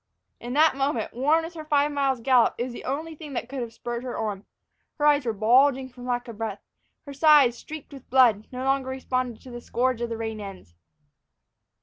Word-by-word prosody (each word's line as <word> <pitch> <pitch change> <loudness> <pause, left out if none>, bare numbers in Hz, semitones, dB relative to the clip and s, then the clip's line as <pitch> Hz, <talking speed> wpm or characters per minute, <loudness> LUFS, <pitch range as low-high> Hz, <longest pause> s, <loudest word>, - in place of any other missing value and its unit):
In 240 +1 -6
that 310 0 +4
moment, 270 -5 -1
worn 295 +7 +2
with 335 - -9
her 315 -2 -7
five 295 -1 +2
miles' 275 -4 0
gallop, 250 -1 +4
it - - -1
was 250 -1 -5
the - - -9
only 310 +5 -3
thing 300 -2 -10
that 240 - -3
could 270 +1 -6
have 235 -1 -5
spurred 240 +1 -5
her 250 -1 -5
on. 205 -3 -3 0.5
Her 295 - 0
eyes 290 -3 +4
were - - +2
bulging 260 +5 +3
from 250 0 -11
lack 245 -1 -2
of 230 -2 -9
breath. 210 -3 -4 0.4
Her 285 - -8
sides, 285 -4 +5
streaked 305 +3 -10
with 270 -2 -13
blood, 235 -5 +4
no 255 0 -5
longer 270 0 0
responded 255 -3 -3
to 255 - -11
the 240 0 -7
scourge 250 0 -1
of 235 - -2
the 230 - -4
rein 220 -1 -4
ends. 195 - -10
255 Hz, 220 wpm, -25 LUFS, 235-280 Hz, 0.5 s, sides